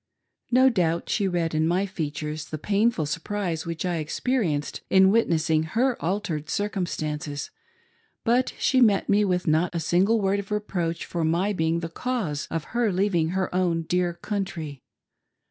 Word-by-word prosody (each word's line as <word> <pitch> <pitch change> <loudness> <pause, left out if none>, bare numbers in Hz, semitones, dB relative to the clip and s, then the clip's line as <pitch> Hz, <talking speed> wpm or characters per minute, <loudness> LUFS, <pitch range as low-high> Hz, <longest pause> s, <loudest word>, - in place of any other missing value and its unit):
No 255 +2 +5
doubt 170 -6 0
she 200 -3 +1
read 170 -3 -1
in 155 +1 +2
my 180 +4 +1
features 155 -3 -4
the 155 - -5
painful 205 +1 +1
surprise 165 +2 -3
which 165 +1 -3
I 175 -2 0
experienced 160 - -1
in 190 0 +6
witnessing 160 -8 +2 0.2
her 255 +1 +3
altered 165 -4 -2
circumstances; 155 -8 -3 0.7
but 245 +3 +2
she 260 -1 +2
met 210 -5 +4
me 205 +1 +4
with 180 -3 0
not 165 +3 +1
a - - +1
single, 185 +8 +2
word 200 0 +1
of 200 - -7
reproach 180 -6 -2
for 170 -2 -3
my 175 +6 +1
being 165 -1 0
the 165 - -3
cause 190 - -3
of 165 -2 -2
her 235 -3 +2
leav 195 +2 +1
ing 160 -2 +2
her 190 +1 -1
own 175 -2 +1
dedr 175 +1 0
country. 175 - -4
175 Hz, 165 wpm, -25 LUFS, 160-205 Hz, 0.7 s, in